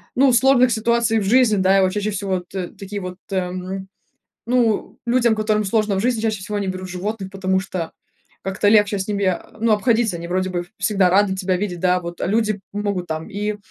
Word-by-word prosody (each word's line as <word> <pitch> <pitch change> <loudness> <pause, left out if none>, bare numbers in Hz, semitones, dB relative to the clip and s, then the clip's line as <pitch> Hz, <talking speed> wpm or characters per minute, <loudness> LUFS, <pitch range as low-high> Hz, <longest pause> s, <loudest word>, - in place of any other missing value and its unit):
ну, 270 +1 +5
сложных 255 0 +5
ситуаций 230 0 +2
в - - -2
жизни, 230 +2 +4
да. 190 +1 +4
И - - +4
вот 185 -1 +2
чаще 210 +1 -2
всего 190 -2 -1
т 180 0 -6
такие 200 +1 -7
вот, 180 -1 -6
э, - - -1
м, 185 +1 -4 0.6
ну, 235 -3 +1
людям, 240 -1 +3
которым 215 0 +1
сложно 210 0 +1
в 190 - 0
жизни, 235 0 0
чаще 220 -2 -1
всего 205 +2 -4
они 200 -1 -2
берут 185 0 -4
животных, 190 +2 -4
потому 190 -1 0
что 185 -3 -4 0.5
как-то 195 +1 0
легче 210 -1 +4
с 190 - -3
ними, 200 -1 -1
а, 185 -2 -1
ну, 225 0 +3
обходиться. 225 -2 +2
Они 170 0 -7
вроде 185 +1 -1
бы 175 -1 -2
ф 175 - -13
всегда 200 -3 +2
рады 195 0 +3
тебя 190 -1 0
видеть, 180 -2 -3
да. 180 +1 +3
А - - -1
вот 170 0 -7
люди 215 +1 +1
могут 205 -3 -2
там 160 +3 -4
и, 210 0 -3
200 Hz, 220 wpm, -21 LUFS, 185-215 Hz, 0.6 s, ну